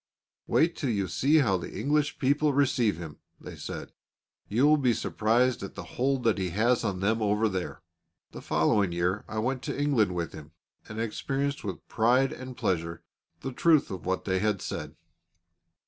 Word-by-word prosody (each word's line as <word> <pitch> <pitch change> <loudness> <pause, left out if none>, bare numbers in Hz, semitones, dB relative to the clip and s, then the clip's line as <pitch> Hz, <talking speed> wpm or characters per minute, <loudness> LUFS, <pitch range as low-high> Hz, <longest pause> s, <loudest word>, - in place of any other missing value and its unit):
"Wait 165 +1 +3
till 140 - -2
you 100 -4 0
see 125 - +2
how 110 -11 +3
the 85 - -7
English 145 +1 +1
people 145 +2 +2
receive 125 - +2
him," 80 -3 -8 0.2
they - - -9
said; - - -7 0.6
"you 120 +7 +2
will 150 +1 +6
be 125 -4 +2
surprised 120 +3 +1
at 100 - -7
the - - -6
hold 135 0 0
that 115 -3 +2
he 95 -1 -1
has 115 +7 +2
on 95 -4 -2
them 110 +3 +1
over 105 +1 +2
there." 95 -3 -4 0.5
The - - -9
following 100 +3 +2
year 90 +4 0
I 110 - -6
went 125 +4 -1
to - - -3
England 120 -11 +2
with 85 -2 -3
him, 80 +1 -11 0.4
and 110 +1 -6
experienced 135 +5 -2
with 95 -5 -6
pride 125 +4 +3
and 130 -1 -8
pleasure 85 -7 -2 0.4
the 135 - -4
truth 155 +2 +3
of 95 -4 -6
what 95 0 -1
they 95 -1 +1
had 105 -1 +1
said. - - -5
110 Hz, 180 wpm, -28 LUFS, 95-135 Hz, 0.6 s, will